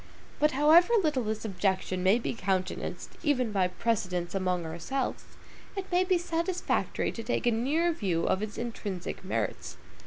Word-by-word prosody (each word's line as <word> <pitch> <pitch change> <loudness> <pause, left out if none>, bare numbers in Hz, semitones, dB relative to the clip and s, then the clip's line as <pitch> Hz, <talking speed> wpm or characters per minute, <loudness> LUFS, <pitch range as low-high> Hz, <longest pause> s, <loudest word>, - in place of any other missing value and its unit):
But 300 -1 +3
however 315 - +6
little 300 -5 +1
this 215 +1 -3
objection 190 -2 0
may 190 +4 +5
be 240 - -2
countenanced, 190 -4 -2
even 255 -7 +1
by 190 -3 +2
precedents 180 -3 -1
among 185 -3 0
ourselves, 170 +12 -3 0.5
it 390 -1 -5
may 355 +1 +4
be 370 -1 +3
satisfactory 345 +1 -1
to 230 - -6
take 230 +2 -1
a 240 - +4
nearer 290 +10 +1
view 185 - -1
of 190 - +1
its 210 -1 -4
intrinsic 205 -7 -4
merits. 190 - -3
225 Hz, 155 wpm, -29 LUFS, 185-300 Hz, 0.5 s, however